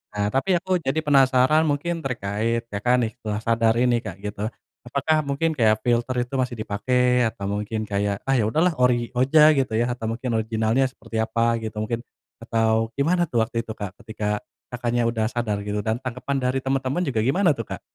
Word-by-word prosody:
Nah, 105 Hz, 0 st, 0 dB
tapi, 180 Hz, +8 st, +1 dB
aku 185 Hz, +1 st, 0 dB
jadi 145 Hz, -3 st, -2 dB
penasaran 140 Hz, +2 st, +4 dB
mungkin 165 Hz, +4 st, -1 dB
terkait, 115 Hz, -3 st, -2 dB
Kakak, 120 Hz, +5 st, +1 dB
nih, 110 Hz, -, -1 dB
setelah 105 Hz, -1 st, -3 dB
sadar 115 Hz, -1 st, +3 dB
ini, 120 Hz, 0 st, +3 dB
Kak, 90 Hz, -, -7 dB
gitu. 105 Hz, +1 st, -3 dB, 0.4 s
Apakah 145 Hz, +4 st, 0 dB
mungkin 140 Hz, +4 st, 0 dB
kayak 110 Hz, -2 st, +3 dB
filter 120 Hz, +1 st, +1 dB
itu 120 Hz, +2 st, -6 dB
masih 125 Hz, -2 st, -1 dB
dipakai 125 Hz, +4 st, +1 dB
atau 100 Hz, -3 st, -3 dB
mungkin 105 Hz, +1 st, -3 dB
kayak, 100 Hz, 0 st, -1 dB
"Ah, 135 Hz, -1 st, +1 dB
ya 110 Hz, -, +2 dB
sudahlah 160 Hz, +11 st, +2 dB
ori 120 Hz, -2 st, +2 dB
aja 150 Hz, +4 st, +6 dB
gitu, 130 Hz, -4 st, 0 dB
ya," 120 Hz, +2 st, +1 dB
atau, 120 Hz, -2 st, -5 dB
mungkin 120 Hz, +3 st, -3 dB
original-nya 110 Hz, +3 st, +1 dB
seperti 115 Hz, -3 st, -8 dB
apa, 115 Hz, +1 st, +1 dB
gitu, 110 Hz, -1 st, -6 dB
mungkin, 115 Hz, +1 st, -2 dB, 0.4 s
atau 115 Hz, -1 st, +1 dB
gimana, 170 Hz, +4 st, +1 dB
tuh, 115 Hz, -4 st, +1 dB
waktu 115 Hz, +1 st, -3 dB
itu, 110 Hz, -, -5 dB
Kak? 100 Hz, -3 st, -5 dB
Ketika 105 Hz, -1 st, -3 dB, 0.3 s
Kakaknya 120 Hz, 0 st, -1 dB
sudah 110 Hz, -2 st, -1 dB
sadar 110 Hz, -4 st, -2 dB
gitu, 105 Hz, 0 st, -1 dB
dan 110 Hz, +2 st, 0 dB
tanggapan 130 Hz, +2 st, -3 dB
dari 125 Hz, +1 st, 0 dB
teman-teman 135 Hz, +5 st, 0 dB
juga 125 Hz, -5 st, -1 dB
gimana, 155 Hz, -, +3 dB
tuh, 115 Hz, -5 st, -6 dB
Kak? -, -, -14 dB
120 Hz, 190 wpm, -23 LUFS, 110-135 Hz, 0.4 s, aja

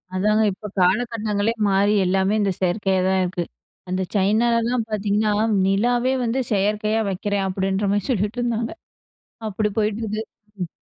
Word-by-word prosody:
அதாங்க 210 Hz, +3 st, +2 dB
இப்ப 200 Hz, +3 st, -8 dB
காலகட்டங்களே 215 Hz, +2 st, +1 dB
மாறி 200 Hz, +1 st, +3 dB
எல்லாமே 190 Hz, +2 st, +2 dB
இந்த 200 Hz, -1 st, +1 dB
செயற்கையா 190 Hz, +1 st, +1 dB
தான் 190 Hz, 0 st, +2 dB
இருக்கு. 180 Hz, -1 st, -2 dB, 0.5 s
அந்த 185 Hz, +1 st, -1 dB
சைனாலலான் 230 Hz, +4 st, +2 dB
பாத்தீங்கன்னா 210 Hz, 0 st, 0 dB, 0.4 s
"நிலாவே 240 Hz, +6 st, +2 dB
வந்து 240 Hz, +2 st, 0 dB
செயற்கையா 210 Hz, +2 st, +1 dB
வக்கிறேன்" 200 Hz, +1 st, -1 dB
அப்படின்ற 195 Hz, +1 st, -1 dB
மாரி 205 Hz, -2 st, 0 dB
சொல்லிட்டு 210 Hz, 0 st, 0 dB
இருந்தாங்க. 235 Hz, -1 st, -1 dB, 0.8 s
அப்படி 210 Hz, +1 st, -1 dB
போயிட்டு 215 Hz, +1 st, 0 dB
இருக்கு! 215 Hz, 0 st, -3 dB, 0.4 s
ம். 180 Hz, -, -2 dB
210 Hz, 135 wpm, -22 LUFS, 195-220 Hz, 0.8 s, மாறி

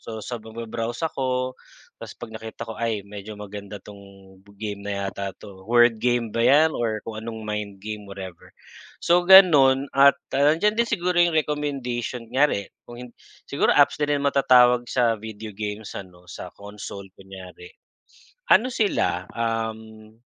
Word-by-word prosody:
so 110 Hz, -, -8 dB
sa 120 Hz, -3 st, -5 dB
mag-ba-browse 115 Hz, +4 st, -5 dB
ako 130 Hz, -4 st, -2 dB, 0.5 s
tapos -, -, -9 dB
'pag 110 Hz, -, -10 dB
nakita 110 Hz, 0 st, -8 dB
ko, 115 Hz, -, -7 dB
"Ay 110 Hz, -4 st, -2 dB
medyo 105 Hz, +1 st, -9 dB
maganda 105 Hz, 0 st, -8 dB
'tong 100 Hz, +1 st, -13 dB, 0.6 s
game 105 Hz, -1 st, -5 dB
na 100 Hz, -1 st, -4 dB
yata 95 Hz, -1 st, -5 dB
'to." 95 Hz, -1 st, -14 dB
Word 120 Hz, -2 st, +4 dB
game 120 Hz, -3 st, 0 dB
ba 115 Hz, -, -1 dB
yan, 150 Hz, +6 st, +5 dB
or 110 Hz, -2 st, -2 dB
kung 110 Hz, -1 st, -6 dB
anong 110 Hz, -1 st, -7 dB
mind 105 Hz, -2 st, -5 dB
game, 105 Hz, -2 st, -7 dB
whatever. 95 Hz, -3 st, -9 dB, 0.6 s
So 175 Hz, +1 st, +3 dB
gano'n 140 Hz, -8 st, +7 dB
at, 140 Hz, +1 st, +6 dB, 0.2 s
ah, 145 Hz, +3 st, +3 dB
nandiyan 210 Hz, +5 st, +2 dB
din 235 Hz, -, +1 dB
siguro 180 Hz, -1 st, +1 dB
yung 170 Hz, -2 st, +3 dB
recommendation, 135 Hz, -6 st, -2 dB
kunyari 125 Hz, -4 st, 0 dB, 0.2 s
kung 120 Hz, -, -10 dB
hin 120 Hz, -, -13 dB, 0.3 s
siguro -, -, 0 dB
apps -, -, +4 dB
na 145 Hz, -, +1 dB
rin 145 Hz, -1 st, 0 dB
matatawag 125 Hz, -3 st, +4 dB
sa 115 Hz, -4 st, +1 dB
video 110 Hz, 0 st, -8 dB
games 105 Hz, +1 st, -6 dB
ano, 90 Hz, -2 st, -10 dB
sa 90 Hz, 0 st, -9 dB
console 100 Hz, -1 st, -9 dB
kunyari. 95 Hz, -2 st, -13 dB, 0.8 s
Ano 255 Hz, -, +5 dB
sila, 200 Hz, -, 0 dB
um 110 Hz, -1 st, -4 dB
115 Hz, 155 wpm, -24 LUFS, 105-130 Hz, 0.8 s, gano'n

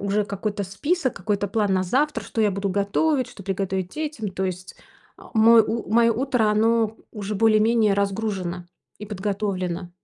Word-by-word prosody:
уже 200 Hz, +1 st, 0 dB
какой-то 205 Hz, +1 st, -3 dB
список, 265 Hz, -, -1 dB
какой-то 205 Hz, +1 st, -1 dB
план 205 Hz, -1 st, 0 dB
на 185 Hz, -1 st, +2 dB
завтра, 260 Hz, +5 st, 0 dB
что 215 Hz, +3 st, -4 dB
я 210 Hz, -1 st, +3 dB
буду 200 Hz, +1 st, -2 dB
готовить, 220 Hz, +9 st, +1 dB
что 195 Hz, -, -12 dB
приготовить 190 Hz, -1 st, -2 dB
детям, 300 Hz, -9 st, -4 dB
то 190 Hz, +1 st, -3 dB
есть, 185 Hz, 0 st, -5 dB, 0.4 s
э, -, -, -15 dB
мой 225 Hz, +1 st, +7 dB
у 225 Hz, +1 st, -4 dB
моё 230 Hz, 0 st, +5 dB
утро- 255 Hz, -2 st, +1 dB
оно 225 Hz, +1 st, +2 dB
уже 210 Hz, -1 st, -5 dB
более-менее 220 Hz, 0 st, +3 dB
разгружено 195 Hz, -3 st, -2 dB, 0.3 s
и 210 Hz, -, -8 dB
подготовлено. 190 Hz, -3 st, -3 dB
210 Hz, 160 wpm, -23 LUFS, 195-225 Hz, 0.4 s, мой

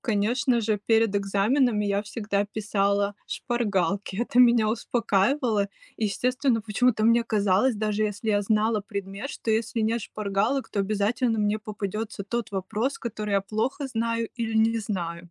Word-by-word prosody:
конечно 235 Hz, +4 st, +1 dB
же, 215 Hz, -1 st, 0 dB
перед 225 Hz, -2 st, +3 dB
экзаменами 210 Hz, +3 st, +2 dB
я 200 Hz, 0 st, 0 dB
всегда 205 Hz, -2 st, -2 dB
писала 200 Hz, -1 st, 0 dB
шпаргалки. 200 Hz, -5 st, -1 dB
Это 240 Hz, +2 st, 0 dB
меня 235 Hz, -3 st, +6 dB
успокаивало. 225 Hz, 0 st, +1 dB, 0.3 s
Естественно, 245 Hz, +3 st, 0 dB
почему-то 220 Hz, +1 st, +1 dB
мне 230 Hz, +1 st, +4 dB
казалось, 210 Hz, +2 st, +2 dB
даже 215 Hz, 0 st, -1 dB
если 210 Hz, +1 st, -3 dB
я 205 Hz, -1 st, +2 dB
знала 215 Hz, +1 st, +1 dB
предмет, 200 Hz, +3 st, -6 dB
что, 225 Hz, -, -4 dB
если 225 Hz, +1 st, 0 dB
нет 225 Hz, +2 st, +1 dB
шпаргалок, 210 Hz, +7 st, -1 dB
то 200 Hz, -, -1 dB
обязательно 215 Hz, +4 st, 0 dB
мне 210 Hz, +1 st, +1 dB
попадется 215 Hz, 0 st, -5 dB
тот 235 Hz, 0 st, -3 dB
вопрос, 210 Hz, +7 st, -2 dB
который 210 Hz, -3 st, -4 dB
я 200 Hz, -, +3 dB
плохо 220 Hz, +8 st, -2 dB
знаю 230 Hz, -1 st, -1 dB
или 225 Hz, -2 st, -2 dB
не 225 Hz, +1 st, +3 dB
знаю. 175 Hz, -5 st, -4 dB
215 Hz, 145 wpm, -26 LUFS, 200-230 Hz, 0.3 s, меня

